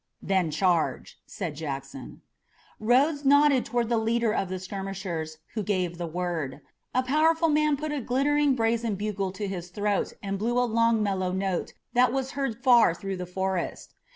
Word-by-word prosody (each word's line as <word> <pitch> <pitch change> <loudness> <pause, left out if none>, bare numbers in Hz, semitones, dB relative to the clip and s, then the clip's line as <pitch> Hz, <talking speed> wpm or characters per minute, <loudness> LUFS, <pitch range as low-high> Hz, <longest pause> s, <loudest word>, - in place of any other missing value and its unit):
"Then 190 -4 +1
charge," 170 +2 0
said 170 -7 -5
Jackson. 135 -3 -7 0.6
Rodes 275 +7 +3
nodded 285 -1 +5
toward 240 -1 0
the 235 -1 +1
leader 230 0 +1
of 195 - -1
the 185 - -3
skirmishers, 185 -4 -5 0.2
who 220 - -2
gave 185 -4 -1
the 170 - -3
word. 160 -5 -3 0.3
A 255 - +3
powerful 320 +5 +3
man 300 -1 +2
put 305 +1 -4
a 295 -2 -2
glittering 280 +3 +2
brazen 225 -2 0
bugle 200 -1 -2
to 200 +1 -4
his 180 -2 -5
throat 205 +1 -1
and 195 -1 -3
blew 235 +3 0
a 245 - +3
long, 230 -1 +2
mellow 190 -3 0
note 190 -1 -2 0.2
that 245 0 +4
was 265 0 -2
heard 265 -4 -3
far 240 -9 +6
through 195 +1 -5
the 180 0 -5
forest. 190 -1 -3
210 Hz, 170 wpm, -27 LUFS, 185-250 Hz, 0.6 s, far